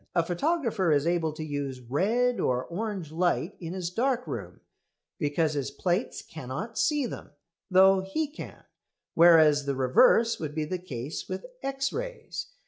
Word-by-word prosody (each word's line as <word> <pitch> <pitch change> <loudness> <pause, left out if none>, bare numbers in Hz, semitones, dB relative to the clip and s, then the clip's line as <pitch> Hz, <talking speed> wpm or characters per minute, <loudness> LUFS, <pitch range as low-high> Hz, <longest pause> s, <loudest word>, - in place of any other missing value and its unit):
A 170 - +3
photographer 220 - 0
is 145 0 +3
able 170 -2 +1
to 155 - -6
use 145 -3 -4
red 210 - +1
or 125 0 0
orange 190 -3 -4
light 175 +2 0
in 170 -1 -6
his 180 -2 -4
dark 250 +4 0
room - - -7 0.6
because 155 0 +1
his 140 -2 -2
plates 175 - -2
cannot 160 - -6
"see" 295 -3 +1
them, 235 - -7 0.4
though 190 +1 +6
he 195 +12 -2
can; 295 - -10 0.5
whereas 160 -4 +6
the 140 - 0
reverse 225 - +4
would 150 -2 -5
be 155 -1 -1
the 180 +4 -3
case 145 -5 -6
with - - -5 0.2
X 275 0 -2
rays. - - -5
175 Hz, 155 wpm, -28 LUFS, 150-230 Hz, 0.6 s, though